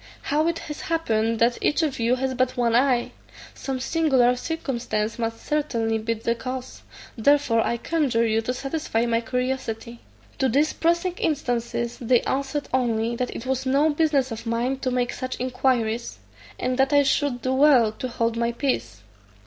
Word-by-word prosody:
How 305 +3 +1
it 335 -1 0
has 300 -2 -7
happened 230 -9 0
that 235 +2 +2
each 310 +2 +2
of 285 -5 -1
you 235 +2 +2
has 260 0 -2
but 255 0 0
one 235 -2 +2
eye? 250 -1 +2 0.4
Some 265 -1 -4
singular 265 -4 +3
circumstance 240 -7 -3
must 225 -1 -3
certainly 230 -7 0
be 230 +1 -1
the 230 +1 -1
cause; 255 +2 -6 0.3
therefore 265 -1 +3
I 235 - -1
conjure 260 -5 +1
you 225 0 +1
to 245 +3 -2
satisfy 270 -4 -1
my 230 -1 +1
curiosity." 240 -1 -3 0.4
To 265 - +2
these 290 +6 +2
pressing 340 +2 +1
instances 240 -5 -1
they 245 0 +3
answered 275 +1 -2
only, 235 -2 +1
that 250 0 -3
it 230 - -6
was 265 0 -1
no 285 +4 +3
business 290 -4 +1
of 225 +1 -6
mine 240 +4 -1
to 265 - -1
make 250 -1 0
such 255 0 -5
inquiries, 250 - 0 0.4
and 255 +1 -2
that 270 +2 +3
I 285 0 +6
should 275 -2 0
do 255 - 0
well 260 -5 +5
to 255 - -5
hold 230 -2 -1
my 235 0 0
peace. 120 - -2
250 Hz, 175 wpm, -24 LUFS, 230-275 Hz, 0.4 s, I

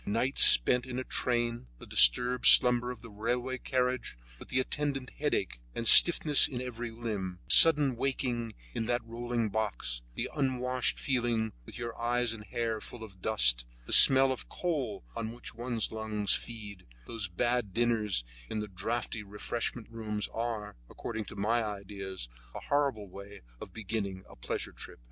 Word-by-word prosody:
Nights 115 +6 +2
spent 125 - +6
in 125 -1 -6
a 130 - -3
train, 120 - -2
the - - -12
disturbed 120 - +5
slumbers 125 0 +5
of - - -17
the 115 - -11
railway 125 +5 -3
carriage, 125 - -2 0.2
with - - -12
the 130 - 0
attendant 135 -1 -3
headache, 140 - -2 0.2
and 115 - -3
stiffness 155 -1 +7
in 125 - -6
every 120 -1 -6
limb, 105 -6 -5
the - - +6
sudden 150 -5 +7
waking 120 -3 -3 0.2
in 115 - -4
that 120 0 -1
rolling 115 -1 -3
box, 100 - -3
the - - -3
unwashed 130 -3 -1
feeling, 120 -4 -1
with - - -9
your 120 -1 -6
eyes 120 0 0
and 105 -2 -10
hair 115 -2 -3
full 120 - -9
of 95 -4 -13
dust, - - +2 0.2
the - - -2
smell 135 0 +8
of 130 - -3
the - - -9
coal 140 - -4
on 115 0 -5
which 120 - -8
one's 120 -1 -3
lungs 110 -2 0
feed, 105 - -6 0.2
those 110 - -4
bad 120 +4 -1
dinners 110 - 0 0.3
in 110 - -3
the 105 - -4
draughty 110 +4 -4
refreshment 110 +3 -4
rooms 105 -2 -3
are, 115 - -5
according 110 -2 -6
to - - -11
my 115 +4 0
ideas, 100 - -7 0.3
a - - -5
horrible 140 -8 -1
way 100 +2 -12 0.2
of - - -10
beginning 100 -3 -5
a - - -15
pleasure - - -5
trip. - - -11
115 Hz, 165 wpm, -29 LUFS, 105-125 Hz, 0.3 s, smell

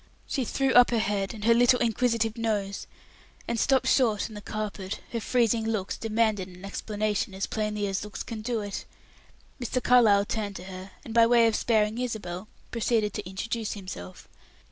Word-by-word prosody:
She 265 - -2
threw 270 +3 +1
up 245 0 +8
her 235 - +1
head 205 -3 0
and 220 -3 -8
her 230 +2 +6
little 245 +1 +5
inquisitive 230 -1 +1
nose, 210 -4 -2 0.6
and 235 -1 -1
stopped 265 +2 +3
short 225 -6 +2
on - - -11
the 210 - -8
carpet; 205 -2 -4
her 235 - -1
freezing 230 -1 +2
looks 220 -4 -2
demanded 220 -3 0
an 180 +1 -11
explanation, 210 -1 -2
as 195 - -1
plainly 210 -1 -2
as 195 0 -2
looks 210 -1 -6
can 225 -2 -6
do 230 0 -1
it. 205 -1 -5 0.8
Mr. 245 +1 -1
Carlyle 225 -6 +5
turned 205 -2 -3
to 180 - -7
her, 185 0 -8 0.2
and 225 - -7
by 230 0 +6
way 235 -1 +5
of 225 -1 +2
sparing 220 0 +1
Isabel, 210 -6 -4 0.2
proceeded 225 -3 +1
to 180 - -5
introduce 220 +3 -3
himself. 185 - -8
215 Hz, 180 wpm, -27 LUFS, 200-230 Hz, 0.8 s, up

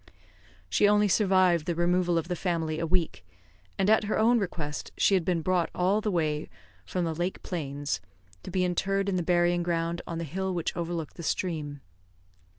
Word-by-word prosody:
She 205 - +3
only 210 0 +4
survived 185 -4 +3
the 170 - 0
removal 175 0 +2
of 165 0 -1
the 180 - -2
family 165 -3 -1
a 165 - -1
week; 170 - 0 0.5
and 195 - +1
at 215 0 +4
her 210 - 0
own 230 +2 +4
request 160 -7 -4 0.2
had 190 -3 +3
been 170 -2 0
brought 180 -1 +1
all 190 +4 +2
the 215 - -1
way 155 -5 -1 0.4
from 180 -2 -1
the 165 - -1
lake 175 +4 -3
plains 145 -4 -3 0.4
to - - -8
be 185 0 +1
interred 195 +2 0
in 190 - 0
the 180 - +1
burying 175 0 +2
ground 170 0 -1
on 165 - -4
the 170 - -3
hill 185 +4 -3
which 170 - -2
overlooked 170 -2 -4
the - - -6
stream. 155 -4 -2
175 Hz, 185 wpm, -28 LUFS, 165-185 Hz, 0.5 s, only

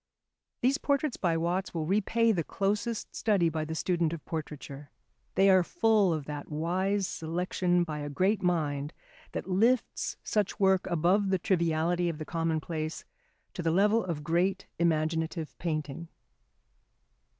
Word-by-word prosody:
These 270 +4 +2
portraits 280 -1 0
by 170 -3 0
Watts 175 +3 -1
will 160 -2 -1
repay 215 +5 +2
the 175 -6 0
closest 205 +6 -2
study 195 -6 +2
by 160 -1 -2
the 160 +1 -4
student 170 -1 0
of 165 - -7
portraiture. 145 -3 -6 0.5
They 195 - +5
are 190 -1 +6
full 210 +1 +3
of 155 -3 -2
that 145 0 -6
wise 185 +6 0
selection 175 +2 0
by 155 -3 -4
a 145 0 -4
great 190 +8 +1
mind 150 -4 0 0.4
that - - -4
lifts 225 +7 +1
such 210 0 -1
work 190 -2 +3
above 180 +4 +2
the 190 - +3
triviality 170 -1 +1
of 165 - -4
the 155 - -6
commonplace 160 -1 -2 0.5
to 185 - -4
the 165 - +1
level 205 +6 +3
of 165 -5 -4
great 180 +4 +1
imaginative 160 0 0
painting. 155 -1 -3
175 Hz, 145 wpm, -29 LUFS, 160-195 Hz, 0.5 s, are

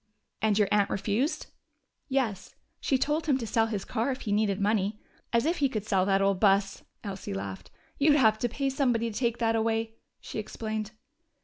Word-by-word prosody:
"And 215 -2 +2
your 210 -2 +4
aunt 205 -1 +3
refused?" 225 - -1 0.6
"Yes. 250 -8 -1 0.2
She 270 - +1
told 300 +4 0
him 275 -4 +3
to 240 - -4
sell 225 +1 +2
his 210 -3 -3
car 230 +2 -1
if 260 0 -3
he 210 - -3
needed 205 -1 +1
money. 205 0 +1 0.3
As 235 +1 +2
if 335 +3 +1
he 280 -2 +2
could 215 -5 -3
sell 190 -3 +2
that 195 0 +3
old 195 -1 +2
bus!" 195 -1 +3 0.2
Elsie 195 - -5
laughed. 95 -1 -6 0.3
"You'd 290 +1 +5
have 220 -6 +4
to 240 - 0
pay 275 +3 -1
somebody 240 -4 +1
to - - -11
take 235 -2 0
that 225 -1 +1
away," 225 0 0 0.2
she - - -6
explained. 215 0 -4
220 Hz, 195 wpm, -28 LUFS, 200-245 Hz, 0.6 s, You'd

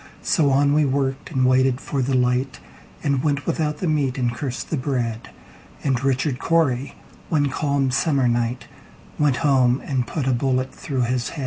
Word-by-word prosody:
So 150 -3 +2
on 140 +1 +3
we 150 +1 +4
worked, 135 -1 -1
and 130 -4 +1
waited 130 0 +3
for 140 -1 -3
the 130 +1 0
light, 125 - 0 0.4
And 140 -3 +1
went 140 -2 0
without 150 -2 -1
the 180 - -2
meat, 145 -4 0
and 120 -2 0
cursed 130 +1 -5
the - - +1
bread; 125 -5 -2 0.5
And 130 -2 0
Richard 135 0 0
Cory, 140 -5 +1 0.3
one 145 -3 +2
calm 140 -1 0
summer 135 -1 +2
night, 120 +1 -1 0.5
Went 145 -3 +3
home 130 -2 +3
and 130 -3 -1
put 150 -5 -3
a 130 - +2
bullet 130 +1 0
through 140 -9 -3
his 125 0 -1
head. 160 - -8
135 Hz, 180 wpm, -22 LUFS, 125-145 Hz, 0.5 s, we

